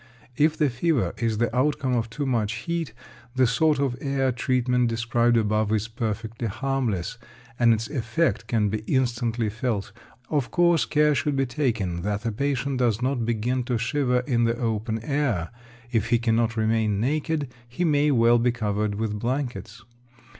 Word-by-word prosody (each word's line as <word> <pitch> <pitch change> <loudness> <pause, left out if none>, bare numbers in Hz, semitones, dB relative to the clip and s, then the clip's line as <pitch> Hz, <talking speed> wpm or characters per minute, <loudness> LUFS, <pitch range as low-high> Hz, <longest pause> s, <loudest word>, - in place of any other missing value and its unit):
If 155 +3 +2
the 150 -4 +2
fever 140 +2 0
is 115 -2 0
the 120 +1 0
outcome 135 0 +1
of 115 -2 0
too 145 +6 -4
much 115 -5 0
heat, 165 +7 -3 0.4
the 130 0 +4
sort 150 +6 +2
of 135 -3 0
air 135 -2 0
treatment 125 -1 +1
described 115 +1 +1
above 110 -1 +1
is 110 0 0
perfectly 115 0 -4
harmless, 120 -4 -2 0.4
and 120 -1 +5
its 110 0 0
effect 130 +3 -1
can 110 -3 +1
be 110 +2 -2
instantly 120 -3 0
felt. 110 -2 -2 0.4
Of 145 -5 0
course, 175 -2 +3
care 150 0 +3
should 145 +1 0
be 135 0 +1
taken 115 - -1
that 105 +3 -2
the 115 - -1
patient 140 +2 -1
does 120 -2 +1
not 125 -3 0
begin 120 +3 0
to 125 -1 0
shiver 125 +1 +1
in 120 -3 +1
the 115 0 0
open 110 -1 -1
air. 135 - -1 0.4
If 115 -4 0
he 120 - +4
cannot 115 0 +1
remain 110 -2 +1
naked, 145 +3 -1 0.2
he 175 +9 -1
may 150 -2 +3
well 120 -3 +4
be 120 +1 +2
covered 105 -2 -1
with 105 0 -2
blankets. 120 -3 -3
120 Hz, 170 wpm, -25 LUFS, 110-135 Hz, 0.4 s, and